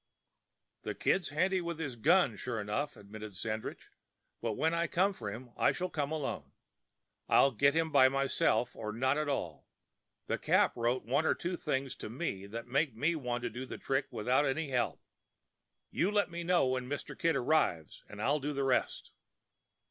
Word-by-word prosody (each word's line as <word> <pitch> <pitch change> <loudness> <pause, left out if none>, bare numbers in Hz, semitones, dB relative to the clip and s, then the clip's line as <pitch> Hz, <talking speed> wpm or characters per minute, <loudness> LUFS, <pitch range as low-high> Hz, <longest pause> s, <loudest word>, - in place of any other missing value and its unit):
"The - - -4
Kid's 185 -4 +1
handy 185 +5 +1
with 170 -1 -4
his 145 -6 -4
gun, 155 - +4
sure 115 +1 -4
enough," 105 +8 -2
admitted 105 0 -9
Sandridge, 110 +2 -5 0.5
"but 115 -2 -1
when 160 +9 +1
I 170 0 +1
come 190 +5 +2
for 105 - -5
him 120 +3 -9
I - - +3
shall 185 0 -3
come 145 -1 -2
alone. 155 -3 -4 0.8
I'll 140 - +6
get 140 +5 +3
him 165 -1 +1
by 130 -2 +7
myself 135 -3 +1
or 105 -1 -4
not 130 +4 +1
at 150 -1 -1
all. 85 - -3 0.6
The - - -2
Cap - - +3
wrote 120 0 0
one 140 +7 +1
or - - +3
two 175 +1 -3
things 135 -5 -2
to - - -6
me 110 - -4
that 115 +3 -6
make 135 +1 0
me 155 +9 +1
want 125 -5 -3
to 120 - -1
do 125 +4 -5
the - - -6
trick 135 0 -1
without 125 +6 +1
any 145 +1 -1
help. 125 -2 -1 0.9
You 180 - +1
let 205 -3 +1
me 170 0 -4
know 175 -3 +3
when 130 -1 -1
Mr. 145 - -4
Kid 165 0 +1
arrives, 120 - +1
and 105 - -10
I'll 140 +7 +2
do 145 +1 -3
the 140 -1 -1
rest." 130 -2 0
135 Hz, 185 wpm, -32 LUFS, 115-160 Hz, 0.9 s, by